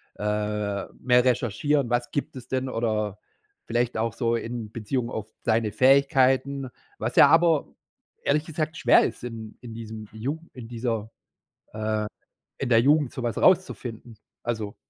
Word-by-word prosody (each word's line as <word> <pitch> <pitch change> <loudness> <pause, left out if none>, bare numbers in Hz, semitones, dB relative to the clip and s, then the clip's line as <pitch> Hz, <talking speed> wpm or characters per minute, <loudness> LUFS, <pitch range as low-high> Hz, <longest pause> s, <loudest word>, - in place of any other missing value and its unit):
äh, 105 -1 -2
mehr 125 -1 +4
recherchieren, 125 +2 +1
was 120 0 0
gibt 145 - -3
es 125 - -9
denn 130 0 -1
oder 110 -4 -1 0.5
vielleicht 120 0 0
auch 115 -1 0
so 115 -2 0
in 115 -2 -4
Beziehung 115 +2 -2
auf 110 -1 -4 0.2
deine 110 -2 +1
Fähigkeiten, 135 +1 +3 0.3
was - - -3
ja - - +9
aber 165 -2 +4 0.6
ehrlich 150 +2 +1
gesagt 155 0 -3
schwer 120 - +5
ist, - - -5
in 115 -3 -7
in 120 -2 -9
diesem 110 -1 -7
Jugen 140 +10 -5
in 120 -3 -9
dieser 115 -2 -3 0.6
äh, 110 0 -1 0.5
in 135 - -2
der 115 -2 +6
Jugend 145 0 +3
so 130 - -5
was 120 -2 -2
rauszufinden. 125 - +1 0.3
Also 110 -4 -3
120 Hz, 150 wpm, -26 LUFS, 110-135 Hz, 0.6 s, ja